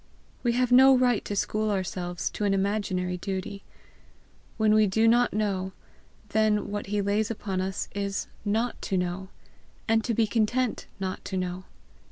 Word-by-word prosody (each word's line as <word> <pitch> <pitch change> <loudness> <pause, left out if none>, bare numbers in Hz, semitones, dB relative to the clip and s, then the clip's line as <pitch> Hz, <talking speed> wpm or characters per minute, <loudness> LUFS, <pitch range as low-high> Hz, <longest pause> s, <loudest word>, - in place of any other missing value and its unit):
We 240 -2 +1
have 250 0 +1
no 265 +1 +8
right 245 -4 +2
to 205 - -3
school 215 +2 0
ourselves 180 -3 -2
to - - -4
an 200 -1 +2
imaginary 190 -2 -1
duty. 190 +1 -5 0.9
When 215 -1 +4
we 215 -1 +5
do 220 +4 +3
not 240 +2 +4
know, 195 -3 -1 0.6
then 210 -1 +1
what 205 0 -4
he 205 0 0
lays 205 +2 +1
upon 195 -4 -3
us 190 0 -3
is 200 0 -2 0.2
NOT 220 +4 -1
TO 195 - -1
KNOW, 180 +1 -2 0.6
and 225 0 +3
to 230 -1 -1
be 225 - +3
content 230 +3 0
not 190 0 -4
to 190 - -3
know. 180 0 -3
205 Hz, 165 wpm, -27 LUFS, 190-220 Hz, 0.9 s, no